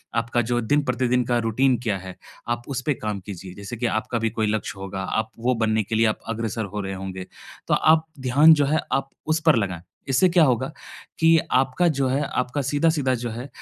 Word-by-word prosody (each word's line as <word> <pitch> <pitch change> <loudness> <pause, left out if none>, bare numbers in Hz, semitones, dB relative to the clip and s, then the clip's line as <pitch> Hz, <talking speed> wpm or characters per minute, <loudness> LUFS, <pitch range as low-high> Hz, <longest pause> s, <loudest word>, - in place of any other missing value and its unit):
आपका 115 +1 +1
जो 120 - +2
दिन-प्रतिदिन 125 -1 +1
का 120 0 +1
रूटीन 130 +3 +2
क्या 105 -5 0
है, 95 -1 -9 0.3
आप 120 0 -1
उस 135 -2 -2
पे 150 - +3
काम 105 -3 -4
कीजिए। 95 -2 -8
जैसे 100 +4 -7
कि 120 - -2 0.2
आपका 120 - -3
भी 115 0 0
कोई 110 -1 -1
लक्ष्य 105 -2 -3
होगा, 95 0 -5
आप 110 +3 -2
वो 125 +2 +1
बनने 110 0 +1
के 110 - -3
लिए 115 +1 +3
आप 110 - -1
अग्रसर 115 -1 -2
हो 105 - -1
रहे 95 0 -4
होंगे, 95 -1 -6 0.4
तो - - +2
आप 160 0 +4
ध्यान 140 +5 +6
जो 145 -2 +3
है, 155 +3 +1
आप 135 0 0 0.2
उस 160 +1 +1
पर 160 - +7
लगाएँ। 95 -6 -2 0.3
इससे 135 +8 +4
क्या 170 -1 +5
होगा 125 -4 +1 0.5
कि 165 0 +6 0.2
आपका 135 +7 +2
जो 135 - +2
है, 135 +3 +1
आपका 135 0 -2
सीधा-सीधा 145 -1 +1
जो 120 0 -4
है, 120 +4 -6
120 Hz, 215 wpm, -23 LUFS, 110-135 Hz, 0.5 s, पर